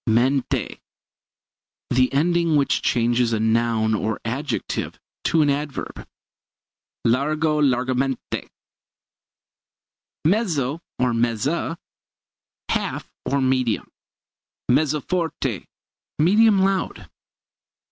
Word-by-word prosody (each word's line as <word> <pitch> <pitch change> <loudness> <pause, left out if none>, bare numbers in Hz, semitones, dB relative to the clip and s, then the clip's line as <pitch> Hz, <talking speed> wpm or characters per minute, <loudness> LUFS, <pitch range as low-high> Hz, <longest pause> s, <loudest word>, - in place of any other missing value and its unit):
Mente 125 +4 +1 1.1
the 130 +1 +3
ending 170 +2 +2
which 140 -2 +2
changes 120 0 +2
a 110 - +1
noun 110 0 +2
or 110 +1 -1
adjective 135 +6 -3 0.3
to 160 -2 +3
an 145 - +2
adverb. 145 0 -4 1.0
Largo 150 +5 +2
largamente. 130 -1 0 1.8
Mezzo 165 - +1 0.2
or 125 -1 +1
mezza 120 +9 0 0.9
half, - - -2
or 140 0 +1
medium. 130 -3 +1 0.8
Mezzo 150 +3 +2
forte 160 - -2 0.5
medium 200 +4 +5
loud. 195 -1 -1
135 Hz, 80 wpm, -23 LUFS, 120-155 Hz, 1.8 s, medium